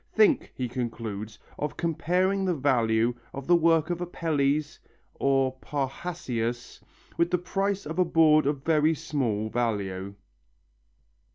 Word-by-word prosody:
"Think," 370 -11 +3
he 125 - -2
concludes, 115 -4 -5 0.2
"of 150 -1 -3
comparing 180 +4 +1
the 185 -2 +1
value 120 -4 +2 0.2
of 135 0 -6
the 175 - +5
work 165 -1 +3
of 175 0 -3
Apelles 155 -4 -1 0.3
or 135 -1 +2
Parrhasius 135 -5 -4 0.4
with 170 0 +2
the 180 - +2
price 195 +2 -2
of 160 +4 -4
a 180 - +5
board 155 -3 +4
of 145 -2 -1
very 160 0 +3
small 130 -9 -1
value." 100 -5 -2
145 Hz, 125 wpm, -27 LUFS, 120-170 Hz, 0.4 s, the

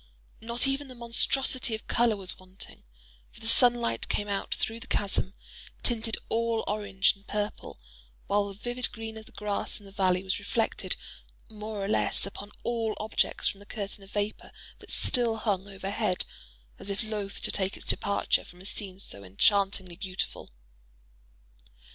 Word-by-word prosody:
Not 235 +3 +3
even 275 +1 0
the 255 - -9
monstrosity 240 +1 +3
of 220 - -9
color 235 -3 +3
was 190 -2 -1
wanting; 185 +1 -7 0.5
for - - -15
the - - -10
sunlight 235 - +5
came 205 - 0
out 200 -1 -2
through 225 +1 0
the - - -8
chasm, 195 -1 +1 0.5
tinted 225 -2 +2
all 230 0 +1
orange 200 -2 +3
and 195 0 -23
purple; 210 - -3 0.5
while 205 0 +2
the 200 - -7
vivid 245 +4 -1
green 225 -1 -6
of 220 0 -9
the - - -14
grass 210 0 -2
in 205 - -15
the 195 - -12
valley 185 -2 +2
was 190 +1 0
reflected 220 +3 +1 0.5
more 215 -2 -4
or - - -2
less 215 - +2
upon 200 +1 -7
all 230 -2 0
objects 215 0 +2
from 195 - -1
the 205 - -13
curtain 200 -2 -5
of 195 - -14
vapor 205 +1 -2 0.3
that - - -14
still 235 -3 +2
hung 205 -3 0
overhead, 195 0 0 0.5
as - - -4
if 200 +3 -1
loth 210 -2 -2
to - - +2
take 190 -1 0
its - - -11
total - - +5
departure 200 - +1
from 175 - -14
a - - -11
scene 195 -2 -1
so 100 - -7
enchantingly 190 - +3
beautiful. 190 -1 -3
205 Hz, 170 wpm, -29 LUFS, 195-225 Hz, 0.5 s, sunlight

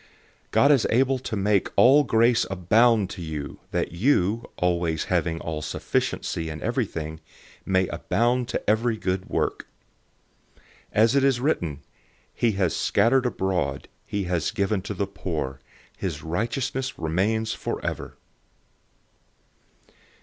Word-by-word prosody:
009:008 - - -27 0.4
And - - -39
God 140 - +5
is 135 -5 +4
able 130 +2 +2
to 120 -3 -4
make 100 -1 +1
all 140 +4 +6
grace 115 -1 +3
abound 105 +3 +3
to 95 - -7
you, 80 -3 -6
that - - -1
you, 105 - +1
always 85 -3 0
having 80 -1 0
all 80 -2 -4
sufficiency 80 +1 -2
in 80 -1 -6
everything, 80 0 -2 0.5
may 95 -1 +3
abound 120 +2 0
to - - -4
every 110 +2 +2
good 95 -2 -2
work. - - -1 0.9
009:009 - - -29 0.3
As 110 +4 +4
it 140 - +4
is 135 -3 +3
written, 85 - -1 0.5
"He 115 -2 +1
has 95 -3 0
scattered 125 +5 +3
abroad, 90 - -2 0.2
he 100 -1 -3
has 90 -3 -1
given 100 -2 0
to 100 +2 -5
the 100 - 0
poor. 80 -9 -4 0.4
His - - -4
righteousness 125 - -2
remains 100 +8 0
forever." - - -4
100 Hz, 135 wpm, -25 LUFS, 85-120 Hz, 0.9 s, all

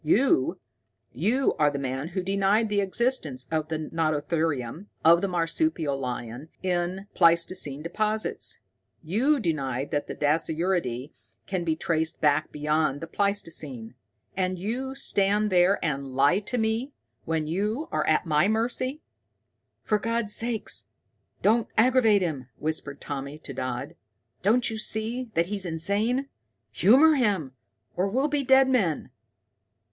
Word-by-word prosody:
You 265 - +2 0.5
you 255 +5 +1
are 150 -1 +5
the 145 - -4
man 135 +1 -3
who 180 +2 -3
denied 200 +3 +2
the 205 -1 +1
existence 190 - -1
of 155 -1 0
the 160 -1 -2
nototherium, 155 - -2 0.2
of 170 +1 +7
the 200 - 0
marsupial 165 - 0
lion, 125 +1 -5
in 180 +1 -1
pleistocene 165 -4 +2
deposits! 215 +5 -1 0.4
You 245 - +2
denied 140 - -2
that 145 - -1
the - - -5
dasyuridae 155 -3 0 0.3
can 185 -2 -2
be 160 -2 0
traced 160 0 -1
back 150 0 +2
beyond 150 -1 0
the 165 - -5
pleistocene. 160 - -3 0.4
And 185 -1 -1
you 250 +8 -3
stand 210 -4 +2
there 180 +2 +4
and 140 -3 -1
lie 145 +8 +4
to 215 +4 -3
me, 225 +5 -1 0.3
when 160 -1 -1
you 210 - -2
are - - 0
at 155 +3 +2
my 155 +2 +3
mercy!" 250 +6 -1 0.8
"For 210 - +1
God's 230 -1 -1
sake 230 -1 -1 0.8
don't 225 +2 +3
aggravate 225 -4 +4
him," 140 -7 -3
whispered 150 -2 -2
Tommy 140 0 -5
to 155 -2 -8
Dodd. 125 -1 -4 0.5
"Don't 225 +5 +3
you 220 - -4
see 225 +4 -1
that 170 - +3
he's 200 +1 -3
insane? 200 - 0 0.4
Humor 280 +10 +6
him, 200 - +1 0.4
or 185 +2 +1
we'll 265 +9 0
be 290 -1 0
dead 265 0 +5
men. 195 - 0
180 Hz, 135 wpm, -26 LUFS, 155-220 Hz, 0.8 s, of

